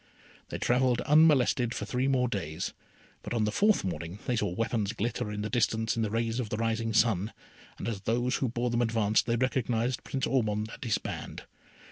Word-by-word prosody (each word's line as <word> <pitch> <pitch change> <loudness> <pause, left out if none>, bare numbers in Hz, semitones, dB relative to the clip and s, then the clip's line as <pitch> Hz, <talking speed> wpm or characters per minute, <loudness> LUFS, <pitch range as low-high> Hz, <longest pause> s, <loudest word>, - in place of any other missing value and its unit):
They - - -4
travelled 125 0 +2
unmolested 140 -6 +4
for - - -3
three 125 +1 0
more 130 -2 +2
days; 80 -9 -3 0.5
but - - -4
on 110 - +2
the 105 - +1
fourth 210 - +3
morning 85 0 -4
they 125 - 0
saw 110 - 0
weapons 110 +2 -1
glitter 115 +1 -2
in 105 0 -3
the - - -1
distance 110 -2 +1
in 115 - -1
the 110 - 0
rays 115 +2 -1
of 115 -4 -2
the 105 - -2
rising 115 0 0
sun, 110 -2 +2 0.5
and - - -5
as 105 -4 -3
those 120 +5 0
who 130 - 0
bore 120 +1 -1
them 120 0 +1
advanced, 110 -2 +2
they 115 - +2
recognised 125 -1 0
Prince 135 - -2
Ormond 110 -4 0
and - - -9
his 115 -4 +1
band. - - -6
115 Hz, 200 wpm, -29 LUFS, 110-125 Hz, 0.5 s, unmolested